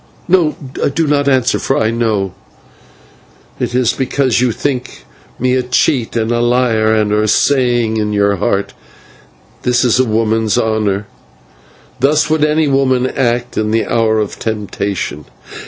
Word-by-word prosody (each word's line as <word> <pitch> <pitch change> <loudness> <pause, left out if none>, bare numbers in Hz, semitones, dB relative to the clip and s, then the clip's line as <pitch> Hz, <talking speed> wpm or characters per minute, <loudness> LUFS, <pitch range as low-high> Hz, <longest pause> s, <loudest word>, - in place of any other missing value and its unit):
No, 170 -4 +2 0.4
do 165 - +1
not 145 -1 +1
answer, 130 -2 +2
for 135 - 0
I 110 0 +1
know 110 -5 -1 1.3
why. - - +1
It 120 - -6
is 125 -2 +2
because 130 -2 0
you 125 -1 +2
think 130 +1 -4 0.3
me 125 +1 0
a 130 - +2
cheater 125 -2 0
and 110 - -3
a 120 - +1
liar, 120 -2 +2
and 110 -1 +1
are 105 +1 +1
saying 120 -2 +2
in 105 -1 -1
your 100 -1 +1
heart, 100 +2 -1 0.9
'This 125 0 +1
is 125 +1 +2
a 130 - +4
woman's 110 -1 0
honour. 105 -2 0 0.9
Thus 150 +3 +2
would 155 -1 +2
any 155 0 +2
woman 130 -2 +2
act 120 -3 -1
in 105 0 -1
the 110 +1 +1
hour 110 -1 +1
of 105 -2 -3
temptation.' 100 -8 -4
120 Hz, 155 wpm, -15 LUFS, 110-130 Hz, 1.3 s, a